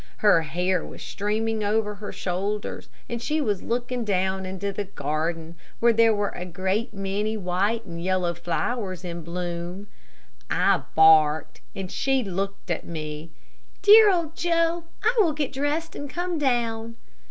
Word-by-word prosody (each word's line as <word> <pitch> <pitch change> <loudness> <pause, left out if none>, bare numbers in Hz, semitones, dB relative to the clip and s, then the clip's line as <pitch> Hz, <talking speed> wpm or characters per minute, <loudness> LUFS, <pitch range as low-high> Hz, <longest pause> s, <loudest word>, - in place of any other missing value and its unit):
Her 205 -6 +5
hair 180 +3 0
was - - -9
streaming 215 +2 -1
over 210 0 +1
her 205 0 -7
shoulders, 195 +3 -3 0.2
and 235 -1 -4
she 305 +5 0
was 210 -9 0
looking 245 +1 -2
down 190 -2 0
into 195 +2 -3
the 205 - -3
garden 160 0 -3 0.3
where 235 0 +5
there 225 0 +5
were 205 -1 0
a 180 - -6
great 190 +6 -2
many 205 +2 -2
white 200 +4 0
and 170 -2 -7
yellow 185 -2 +1
flowers 185 +2 -3
in 170 -1 -5
bloom. 175 +2 -5 0.6
I - - +3
barked, 155 -1 +5
and 190 -2 -5
she 270 -2 +1
looked 195 -1 -4
at 170 - -1
me. 155 -1 -6 0.5
"Dear 425 +1 +9
old 335 -3 -1
Joe, 335 0 +1 0.2
I 455 +2 +4
will 340 -7 +4
get 290 -3 -2
dressed 290 +4 -1
and 285 - -6
come 350 +2 -2
down." 230 -4 0
200 Hz, 155 wpm, -25 LUFS, 180-240 Hz, 0.6 s, Dear